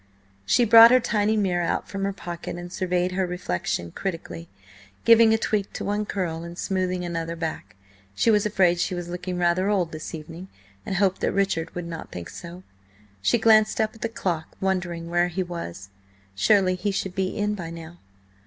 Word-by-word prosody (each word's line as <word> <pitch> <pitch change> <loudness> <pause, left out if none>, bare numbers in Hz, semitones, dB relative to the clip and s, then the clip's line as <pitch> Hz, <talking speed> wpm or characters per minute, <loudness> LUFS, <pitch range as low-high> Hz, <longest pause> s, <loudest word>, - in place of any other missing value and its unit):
She 240 - +4
brought 230 +1 +10
her 255 +1 +6
tiny 215 -2 +1
mirror 180 -4 +1
out 170 - -1
from 195 +1 -3
her 200 - 0
pocket 175 -4 -7
and 175 +1 -8
surveyed 180 0 0
her 185 0 -1
reflection 90 - -3
critically, 165 - -5 0.6
giving 230 -1 +7
a 225 - +4
tweak 210 -3 -1
to - - -5
one 205 +1 -1
curl, 170 -5 -3
and 170 0 -9
smoothing 185 -2 -1
another 165 -1 -3
back. 160 - -5 0.4
She 230 - +3
was 210 -2 +3
afraid 185 -4 +2
she 180 - -1
was 175 -1 -5
looking 180 +1 -4
rather 180 +2 +2
old 185 -5 +1
this 155 +1 -6
evening, 165 +4 -9 0.4
and 190 - -2
hoped 190 0 +1
that - - +1
Richard 190 -4 -1
would 175 -1 -4
not 165 -1 -7
think 85 -1 -7
so. 175 +1 -10 0.6
She 100 - +3
glanced 215 -1 +4
up 220 -1 +1
at 225 - -17
the 230 - -1
clock, 175 -7 -3
wondering 175 -3 -2
where 175 +1 +2
he 180 +2 -2
was; 100 - -7 0.4
surely 185 - +3
he 185 +3 -2
should 190 -1 -2
be 190 0 -2
in 210 0 0
by 175 -5 -6
now? 165 +1 -10
180 Hz, 190 wpm, -25 LUFS, 170-200 Hz, 0.6 s, brought